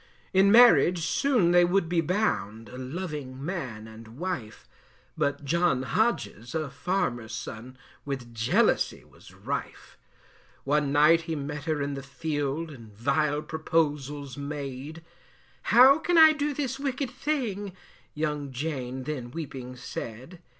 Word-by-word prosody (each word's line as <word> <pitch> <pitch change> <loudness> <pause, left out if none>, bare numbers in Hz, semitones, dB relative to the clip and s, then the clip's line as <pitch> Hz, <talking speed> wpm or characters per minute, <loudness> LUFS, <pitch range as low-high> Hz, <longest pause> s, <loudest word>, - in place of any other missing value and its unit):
In 195 +1 +5
marriage 200 -8 +6
soon 230 - +2
they 175 0 +6
would 175 0 +2
be 170 0 +1
bound, 130 - -1
A 125 - -9
loving 140 -2 -5
man 130 - -5
and 110 +1 -12
wife, 170 -11 -5 0.5
But 140 0 -1
John 165 -4 +2
Hodges, 130 - -1
a 155 -4 -2
farmer's 120 -8 -2
son, 120 +3 -8 0.3
With 130 -4 -5
jealousy 115 0 +1
was - - -18
rife. - - -6 0.6
One 145 0 +1
night 150 +3 +5
he 160 - -1
met 145 0 -5
her 155 -3 0
in 140 0 -3
the 135 - -5
field, 145 +2 -3
And 115 -6 -12
vile 145 +7 0
proposals 145 -4 -1
made; 145 +2 -6 0.7
How 265 +5 +8
can 350 +1 +1
I 315 -1 +9
do 300 -1 -1
this 270 -2 -2
wicked 275 -1 -2
thing; 230 -9 -3 0.4
Young 150 -2 -2
Jane 130 -2 -4
then 130 -4 -5
weeping 130 -4 -7
said. 125 +7 -8
150 Hz, 135 wpm, -27 LUFS, 130-180 Hz, 0.7 s, I